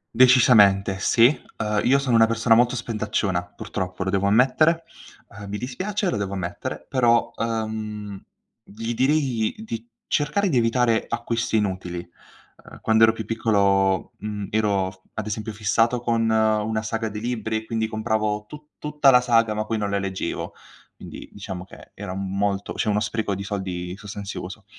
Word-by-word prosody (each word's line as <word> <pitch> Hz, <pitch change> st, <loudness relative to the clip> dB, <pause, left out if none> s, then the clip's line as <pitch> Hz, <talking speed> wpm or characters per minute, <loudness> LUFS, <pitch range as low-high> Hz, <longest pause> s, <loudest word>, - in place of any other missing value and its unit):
Decisamente, 105 Hz, -6 st, +5 dB
sì. 115 Hz, +3 st, +5 dB, 0.3 s
Uhm, 105 Hz, -1 st, 0 dB
io 135 Hz, +3 st, +5 dB
sono 135 Hz, -4 st, +1 dB
una 115 Hz, 0 st, +6 dB
persona 115 Hz, +1 st, +2 dB
molto 120 Hz, +2 st, +4 dB
spendacciona, 105 Hz, -6 st, -1 dB
purtroppo 90 Hz, -1 st, -5 dB
lo 95 Hz, -, -2 dB
devo 100 Hz, 0 st, +1 dB
ammettere. 135 Hz, +10 st, +3 dB, 0.5 s
Uhm, 100 Hz, 0 st, -10 dB
mi 105 Hz, -, -3 dB
dispiace, 190 Hz, -, -3 dB
lo -, -, -1 dB
devo 100 Hz, -1 st, -3 dB
ammettere. 85 Hz, -2 st, -5 dB
Però, 120 Hz, -3 st, +2 dB
uhm, 110 Hz, -3 st, -4 dB, 0.4 s
gli 115 Hz, +3 st, -5 dB
direi 130 Hz, -4 st, +1 dB
di 115 Hz, -, -6 dB, 0.2 s
cercare 190 Hz, +7 st, +1 dB
di 130 Hz, -, +1 dB
evitare 115 Hz, 0 st, +2 dB
acquisti 115 Hz, -1 st, -1 dB
inutili. 90 Hz, -4 st, -3 dB, 0.6 s
Uhm, -, -, -13 dB
quando 110 Hz, 0 st, +5 dB
ero 110 Hz, -, +4 dB
più 110 Hz, -1 st, -6 dB
piccolo, 100 Hz, -4 st, +1 dB
mhmm, 105 Hz, -1 st, -5 dB
ero 100 Hz, -3 st, +1 dB
f 95 Hz, -, -20 dB, 0.2 s
ad 110 Hz, -, -3 dB
esempio 110 Hz, +1 st, -4 dB
fissato 115 Hz, +3 st, +1 dB
con 115 Hz, -2 st, +1 dB
una 110 Hz, 0 st, +1 dB
saga 110 Hz, 0 st, -2 dB
di 105 Hz, 0 st, -6 dB
libri 110 Hz, -2 st, -2 dB
e 110 Hz, -, -6 dB
quindi 110 Hz, -1 st, -1 dB
compravo 110 Hz, -1 st, -1 dB
tu 150 Hz, +2 st, -12 dB
tutta 150 Hz, -2 st, +2 dB
la 125 Hz, -1 st, +7 dB
saga, 115 Hz, -3 st, +2 dB
ma 110 Hz, -, -2 dB
poi 110 Hz, 0 st, -2 dB
non 105 Hz, -, -1 dB
la 100 Hz, -, 0 dB
leggevo. 95 Hz, -1 st, -4 dB, 0.4 s
Quindi -, -, -10 dB
diciamo 95 Hz, -3 st, -7 dB
che -, -, -15 dB
era 100 Hz, -2 st, -6 dB
m 95 Hz, 0 st, -4 dB
molto 100 Hz, -1 st, -1 dB
cioè -, -, -1 dB
uno 105 Hz, 0 st, +2 dB
spreco 110 Hz, -2 st, -2 dB
di 100 Hz, +1 st, -4 dB
soldi 95 Hz, -3 st, -4 dB
sostanzioso. 100 Hz, -2 st, -7 dB
110 Hz, 165 wpm, -23 LUFS, 100-115 Hz, 0.6 s, la